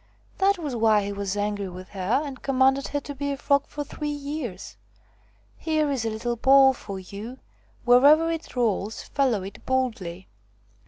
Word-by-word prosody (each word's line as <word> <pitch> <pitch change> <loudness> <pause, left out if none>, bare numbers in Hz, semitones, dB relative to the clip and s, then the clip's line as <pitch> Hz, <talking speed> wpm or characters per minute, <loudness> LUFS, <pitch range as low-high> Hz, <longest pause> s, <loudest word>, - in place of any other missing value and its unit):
That 395 +1 +3
was 295 -7 -4
why 220 -2 +3
he 200 0 -4
was 200 0 -3
angry 205 -1 -2
with 185 +1 -10
her 200 +9 0
and 270 -3 -8
commanded 270 0 +2
her 290 - -2
to 285 - -7
be 285 +1 -3
a 280 - -3
frog 280 +1 +1
for 295 - -5
three 295 +1 -5
years. 285 -9 -5 0.8
Here 310 -2 0
is 255 -5 -2
a - - +1
little 230 +2 -3
ball 270 +2 +6
for 200 -5 -7
you; 205 +7 -8 0.5
wherever 290 +7 +6
it 325 -4 -6
rolls, 220 -3 -1
follow 255 -9 0
it 195 +1 -10
boldly." 220 -9 -2
255 Hz, 170 wpm, -25 LUFS, 205-285 Hz, 0.8 s, ball